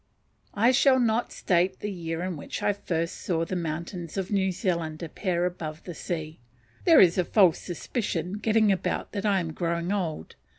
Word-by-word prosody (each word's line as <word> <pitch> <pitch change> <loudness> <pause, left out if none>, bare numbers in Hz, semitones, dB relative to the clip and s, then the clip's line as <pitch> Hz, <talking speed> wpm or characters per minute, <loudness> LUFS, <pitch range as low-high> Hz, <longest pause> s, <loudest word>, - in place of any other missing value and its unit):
I 230 +5 +4
shall 260 0 +5
not 235 -1 +1
state 185 +1 +1
the 210 - -3
year 165 -2 -4
in 185 -1 -3
which 145 - -6
I 205 - +3
first 170 -4 -3
saw 165 -2 -1
the 185 - -4
mountains 170 +1 -4
of 190 0 -3
New 190 -2 +2
Zealand 170 -4 -2
appear 175 +1 -1
above 160 -3 -5
the 175 - -7
sea; 160 -1 -5 0.5
there 330 -3 +7
is 180 0 +6
a - - +4
false 185 -2 +4
suspicion 180 0 -3
getting 220 -1 +3
about 190 - -1
that 205 0 -2
I 200 -2 +3
am 165 -3 -4
growing 170 +1 -1
old. 170 - -3
180 Hz, 180 wpm, -27 LUFS, 165-200 Hz, 0.5 s, there